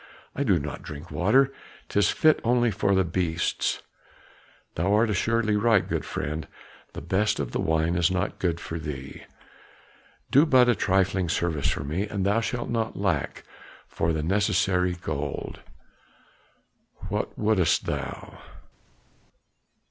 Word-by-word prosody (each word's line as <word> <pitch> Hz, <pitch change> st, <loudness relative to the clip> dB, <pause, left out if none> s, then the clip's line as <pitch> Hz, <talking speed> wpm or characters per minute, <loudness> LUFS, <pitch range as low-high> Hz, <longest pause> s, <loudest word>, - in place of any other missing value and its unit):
"I -, -, -2 dB
do 100 Hz, -9 st, +3 dB
not 75 Hz, +2 st, -5 dB
drink 85 Hz, -3 st, -9 dB
water; 130 Hz, +9 st, +3 dB, 0.3 s
'tis 105 Hz, -, +2 dB
fit 155 Hz, -1 st, +3 dB
only 120 Hz, 0 st, +2 dB
for 100 Hz, -1 st, +1 dB
the 95 Hz, -, +3 dB
beasts." 85 Hz, -1 st, -1 dB, 0.9 s
"Thou 90 Hz, +5 st, 0 dB
art 110 Hz, +1 st, +3 dB
assuredly 110 Hz, +2 st, +1 dB
right, 110 Hz, -1 st, +3 dB
good -, -, -2 dB
friend; 75 Hz, +2 st, -4 dB, 0.5 s
the -, -, -7 dB
best 105 Hz, +3 st, +1 dB
of -, -, -3 dB
the -, -, -1 dB
wine 80 Hz, +1 st, +1 dB
is 85 Hz, -2 st, +2 dB
not 95 Hz, +1 st, -2 dB
too 90 Hz, -, +1 dB
good 85 Hz, -1 st, -1 dB
for 85 Hz, -1 st, -5 dB
thee. 70 Hz, -3 st, -7 dB, 1.1 s
Do 145 Hz, +5 st, +6 dB
but 130 Hz, -4 st, +5 dB
a 120 Hz, -, +5 dB
trifling 95 Hz, -3 st, +1 dB
service 80 Hz, -3 st, 0 dB
for -, -, -2 dB
me, 85 Hz, +9 st, -2 dB
and 100 Hz, -2 st, -2 dB
thou 105 Hz, +3 st, +2 dB
shalt 120 Hz, +1 st, -3 dB
not 115 Hz, -1 st, -2 dB
lack 90 Hz, -8 st, -1 dB, 0.4 s
for 80 Hz, -, -1 dB
the 80 Hz, -1 st, -1 dB
necessary 90 Hz, 0 st, +1 dB
gold." 75 Hz, -5 st, -5 dB, 1.5 s
"What -, -, -3 dB
wouldst 105 Hz, -6 st, +2 dB
thou?" -, -, -5 dB
95 Hz, 140 wpm, -26 LUFS, 80-110 Hz, 1.5 s, Do